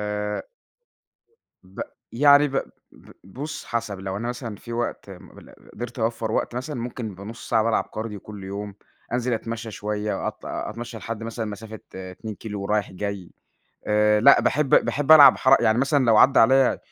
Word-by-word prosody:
آآ 105 0 -3 1.2
ب 95 +1 -12 0.3
يعني 145 +3 +5
ب 135 - -4 0.4
ب - - -18
بُص 135 +11 -7
حسب 115 -4 -3
لو 95 0 -4
أنا 115 +4 -4
مثلًا 120 -3 -5
في 120 - -10
وقت 120 -4 -4
مل 90 - -14
م - - -18
قدرت 120 +2 -7
أوفّر 115 -1 -1
وقت - - -1
مثلًا، 130 +1 -4
ممكن 120 -2 -5
يبقى 95 +1 -11
نُص 115 +3 -9
ساعة 110 - +3
بالعب 115 0 +1
كارديو 110 -2 -5
كلّ 105 -1 -10
يوم، 100 +1 -6 0.4
أنزل 125 0 -1
اتمشّى 115 0 -4
شوية 105 0 -3
أط - - -9
أتمشّى 115 +1 -6
لحد 115 0 -6
مثلًا 115 0 -4
مسافة 110 +1 -8
2 95 +4 -7
كيلو 105 -1 -7
ورايح 105 0 -1
جاي، 100 -2 -5 0.6
آآ 105 0 +3
لأ 140 +5 +7
باحب 150 -1 +1 0.2
باحب 145 +1 +2
العب 145 -3 +9
حرَ 135 +1 +5
يعني 110 +1 +3
مثلًا 140 +1 +2
لو 115 -2 +4
عدّى 135 +5 +6
عليّا 130 +3 +4
110 Hz, 175 wpm, -24 LUFS, 105-120 Hz, 1.2 s, العب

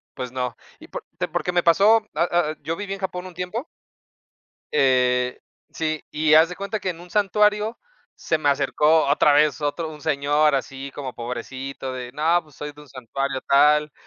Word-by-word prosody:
pues 125 -1 -5
no. 125 -2 -3 0.2
Y - - -13
por, - - -7 0.2
te - - 0
porque 180 - -2
me 175 0 +2
pasó, 210 +6 +4
ah 170 - +2
ah, 165 -3 +1
yo 160 +3 -3
viví 200 +1 -5
en 195 - -7
Japón 185 -1 -4
un 180 - -13
tiempo 180 - -4 1.1
eh 125 -1 +2 0.3
sí, 155 -1 -2
y 155 0 +2
haz 160 +2 +7
de 180 - -6
cuenta 200 +3 -4
que 190 - -3
en 170 -2 -5
un 180 - -13
santuario 210 +2 +2 0.4
se 160 - -1
me 150 -2 -1
acercó 150 +3 +3
otra 145 +1 +4
vez, 150 +1 +3
otro 155 +3 -2
un 150 -1 -10
señor 145 0 +2
así 135 +2 -5
como 135 -3 -6
pobrecito 130 +2 -6
de: 125 -1 -6
"No, 160 +4 +2
pues 150 -3 -21
soy 150 0 -6
de 145 - -18
un 150 - -16
santuario 135 +1 -4
tal". 150 +2 +4
150 Hz, 190 wpm, -23 LUFS, 135-175 Hz, 1.1 s, haz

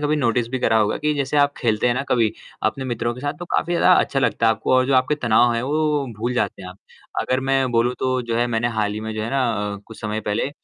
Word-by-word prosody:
कभी 150 +1 +1
नोटिस 120 -4 +1
भी 130 - -2
करा 110 -2 +2
होगा 105 -1 +1
कि 150 0 0
जैसे 140 +1 -1
आप 145 0 +3
खेलते 110 -2 0
हैं 120 - +2
ना 130 - -1
कभी 115 -3 +2 0.3
अपने 130 +5 -2
मित्रों 120 -1 -2
के 125 - -10
साथ, 145 0 -2
तो 165 +4 -9
काफ़ी 175 0 -1
ज़्यादा 180 +1 +5
अच्छा 135 - -1
लगता 115 - +1
है 115 - +5
आपको 110 +3 -2
और 130 0 +3
जो 135 - +2
आपके 130 +3 +3
तनाव 120 -3 +3
हैं 115 - -1
वो 150 0 0
भूल 120 +3 -1
जाते 100 - -2
हैं 90 - -8
आप। 90 +2 -12 0.4
अगर 130 +1 0
मैं 135 -2 +2
बोलूँ 120 +2 +2
तो 130 -1 0
जो 115 -1 -2
है 120 +1 +2
मैंने 120 0 0
हाल 105 -1 0
ही 105 - -5
में 110 0 -5
जो 110 - -3
है 110 - -4
ना 135 -1 +1 0.3
अ, - - -6
कुछ 115 - -12
समय 110 0 -3
पहले 105 +5 -1
125 Hz, 280 wpm, -21 LUFS, 110-135 Hz, 0.4 s, ज़्यादा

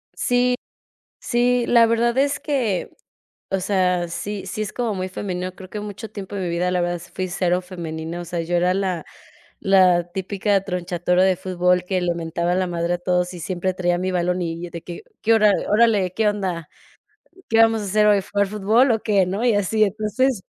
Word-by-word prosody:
Sí, 245 0 +2 0.7
sí, 245 0 +1
la 235 -1 +6
verdad 235 +2 +1
es 280 +1 +1
que, 245 - -1 0.6
o 195 -1 0
sea, 180 -3 +1
sí 200 +3 -5
sí 215 +4 -3
es 210 - -5
como 240 -3 -1
muy 185 0 -3
femenino, 185 -1 -4
creo 185 0 -12
que 210 - -5
mucho 210 +1 -7
tiempo 200 -1 -8
de 195 - -3
mi 180 - -2
vida, 175 +2 0
la 180 - +1
verdad, 175 0 -1
fui 185 0 -2
cero 180 0 0
femenina, 170 -2 -6
o - - -6
sea, 170 0 -3
yo 175 +1 -1
era 180 +1 +2
la 185 -4 -1 0.6
la 180 -3 +4
típica 195 +1 0
Tronchatoro 180 -1 0
de 190 -1 +3
fútbol 180 -1 +1
que 185 0 -1
le 175 -1 +1
mentaba 170 +1 -1
la 185 0 +1
madre 170 0 -1
a - - -3
todos 180 0 0
y 175 - -8
siempre 185 +1 -2
traía 175 -1 0
mi 185 +1 -1
balón 180 0 0
y 170 +1 -4
de 170 -1 -7
que: 175 - -8 0.2
"¿Qué? 225 - +3
Órale. 210 -2 +3
¿Qué 220 +1 +2
onda? 185 -6 -3 0.8
¿Qué 225 - +2
vamos 225 -1 +3
a - - -5
hacer 210 +2 +3
hoy? 205 -1 +5
¿Jugar 200 +1 0
fútbol 215 +6 +3
o 220 - -1
qué?", 200 -4 +3
¿no? 195 +5 -3
Y 235 - +4
así, 205 +2 +1
entonces, 215 +3 0
185 Hz, 200 wpm, -22 LUFS, 175-210 Hz, 0.8 s, la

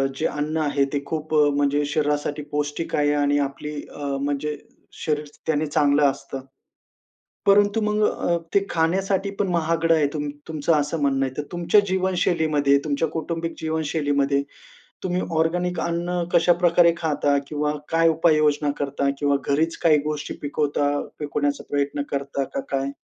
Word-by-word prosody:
जे 155 - -2
अन्न 150 +2 -2
आहे 145 -2 +1
ते 140 -1 -1
खूप 155 +1 -4
अ, 150 -1 +5
म्हणजे 145 0 +1
शरीरासाठी 150 0 -1
पौष्टिक 145 +2 -2
आहे 145 0 +2
आणि 145 0 +2
आपली 150 +2 -8 0.2
अ, 145 - -6 0.2
म्हणजे 145 +1 -2 0.5
शरीर 150 -1 0 0.2
त्याने 155 0 +1
चांगलं 145 -1 +3
असतं. 135 0 -8 1.1
परंतु 205 +2 +4
मग 210 0 0
अ, 170 - 0 0.2
ते 200 0 +4
खाण्यासाठी 190 +4 0
पण 200 - +1
महागडं 165 -1 +2
आहे 150 -2 +2
तुम 150 -1 -2 0.2
तुमचं 160 +1 0
असं 150 +2 -2
म्हणणं 135 -1 +2
आहे. 130 - -5
तर 150 - -1
तुमच्या 175 +4 +4
जीवनशैलीमध्ये 170 -6 +2
तुमच्या 150 +2 0
कौटुंबिक 165 +1 -3
जीवनशैलीमध्ये 145 -3 0 0.6
तुम्ही 180 0 0 0.2
ऑर्गेनिक 175 +2 0
अन्न 175 +1 -1
कशाप्रकारे 170 0 +5
खाता? 145 -3 +1
किंवा 150 0 -1 0.2
काय 165 0 +4
उपाययोजना 155 -3 +3
करता? 140 0 -1
किंवा 145 -1 +2
घरीच 155 +4 +1
काही 155 -3 +6
गोष्टी 150 -1 -4
पिकवता, 145 0 0 0.3
पिकवण्याचा 145 -1 -1
प्रयत्न 145 0 -1
करता 140 0 -2
का 275 - 0
काय? 135 0 -1
150 Hz, 145 wpm, -23 LUFS, 145-165 Hz, 1.1 s, काही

